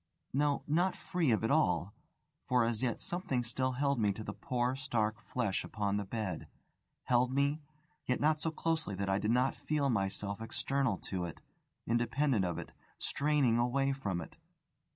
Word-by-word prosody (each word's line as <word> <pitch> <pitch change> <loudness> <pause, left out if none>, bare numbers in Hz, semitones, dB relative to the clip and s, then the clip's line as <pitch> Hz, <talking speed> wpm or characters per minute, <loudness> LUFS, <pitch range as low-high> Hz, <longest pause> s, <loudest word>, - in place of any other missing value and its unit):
No, 145 +1 +2
not 175 +5 +2
free 180 -6 0
of 110 -2 +2
it 115 - +1
all; 95 - +2 0.5
for 125 -2 +4
as 115 -2 -1
yet 125 -3 0
something 155 -9 -1
still 130 +2 -1
held 140 0 +1
me 105 -2 +3
to 110 - -7
the - - -5
poor 125 0 -1
stark 115 -4 -1
flesh 115 -7 -1
upon 100 -2 -1
the 105 - -1
bed 95 -5 -3 0.6
held 125 0 +3
me, 140 +3 +1 0.5
yet 125 - +1
not 155 +1 +3
so 160 - +1
closely 160 -8 -1
that 100 +1 -2
I 95 +1 +2
did 105 - -1
not 125 +3 +3
feel 145 -3 0
myself 100 0 -1
external 135 +3 0 0.2
to 90 -2 0
it, 85 - -7 0.5
independent 120 -1 +2
of 85 -2 -2
it, - - -6 0.3
straining 140 -5 +2
away 135 +3 +2
from 100 -10 -2
it. 80 - -10
125 Hz, 170 wpm, -33 LUFS, 105-140 Hz, 0.6 s, for